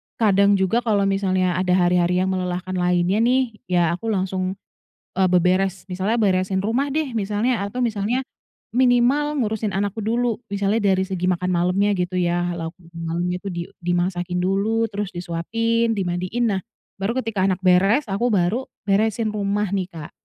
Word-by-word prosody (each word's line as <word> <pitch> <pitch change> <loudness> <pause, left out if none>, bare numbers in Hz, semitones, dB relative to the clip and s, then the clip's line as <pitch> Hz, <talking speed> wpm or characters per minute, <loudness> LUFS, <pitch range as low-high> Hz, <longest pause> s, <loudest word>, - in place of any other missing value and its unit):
kadang 200 -2 +4
juga 190 +4 +2
kalau 215 -4 +1
misalnya 185 -2 +1
ada 185 -1 +2
hari-hari 180 0 +2
yang 190 - 0
melelahkan 185 0 -3
lainnya 180 +2 +2
nih, 250 +1 +2 0.2
ya 180 -1 +2 0.2
aku 225 - -6
langsung, 190 -2 -1 0.6
eee, 190 -1 +3
beberes. 185 +2 +1
Misalnya 190 +6 -1
beresin 190 -2 +1
rumah 245 +8 0
deh 290 -5 -2
misalnya 210 +2 0
atau 205 +5 -4
misalnya 230 +1 0 0.5
minimal 255 +4 +3
ngurusin 215 -2 -1
anakku 205 +2 -2
dulu. 235 +1 0 0.2
Misalnya 200 +2 +1
dari 190 - +1
segi 185 -2 -3
makan 180 0 0
malemnya 185 +3 +1
gitu 180 0 -1
ya, 175 0 0
lauk 165 0 -5 0.2
malamnya 170 +2 -3
itu 200 - -6
di 175 -2 -4 0.2
dimasakin 175 0 -1
dulu, 210 +4 +1
terus 205 0 -3
disuapin, 225 +7 0
dimandiin. 185 +5 -1
Nah, 190 - -1 0.4
baru 210 +5 -1
ketika 220 -4 -2
anak 185 - 0
beres, 195 +9 +4
aku 235 +5 +1
baru 210 +4 0 0.2
beresin 215 +2 +1
rumah 205 -1 -1
nih, 190 -2 -1
Kak. 160 -4 -9
195 Hz, 155 wpm, -22 LUFS, 180-220 Hz, 0.6 s, kadang